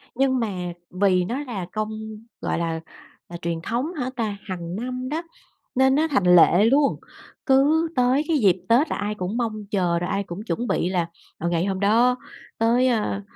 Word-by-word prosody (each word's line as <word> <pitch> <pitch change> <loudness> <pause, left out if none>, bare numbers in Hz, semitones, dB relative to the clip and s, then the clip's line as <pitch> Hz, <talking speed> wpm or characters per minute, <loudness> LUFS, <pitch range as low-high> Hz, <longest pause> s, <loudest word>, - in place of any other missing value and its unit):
Nhưng 260 -1 +2
mà 180 -6 -3 0.2
vì 185 -1 +2
nó 245 +8 -3
là 205 -9 -5
công 215 0 -2 0.5
gọi - - -1
là, 165 -1 -2 0.5
là 170 - -6
truyền 170 -1 -3
thống 250 - -2
hả 255 -5 -3
ta? 215 -4 -2
Hằng 175 -2 -5
năm 255 +3 -4
đó, 315 +3 -2 0.5
nên 265 +1 +4
nó 315 +2 +2
thành 180 -10 +4
lệ 175 +4 +6
luôn, 275 +4 +3 0.5
cứ 295 +5 +4
tới 250 +3 +3
cái 315 -3 +2
dịp 190 -6 +4
Tết 250 +7 +4
là - - -1
ai 205 +1 -2
cũng 190 +3 -4
mong 215 -3 -2
chờ, 175 -4 +1
rồi 175 - -3
ai 200 0 -1
cũng 175 +4 -7
chuẩn 235 +2 -3
bị 175 - 0
là, 175 -3 0 0.3
ờ, 170 - -1
ngày 170 +1 0
hôm 190 -1 -2
đó 235 +5 +4 0.4
tới, 235 +3 +3
a, 210 -4 0
215 Hz, 195 wpm, -23 LUFS, 180-255 Hz, 0.5 s, lệ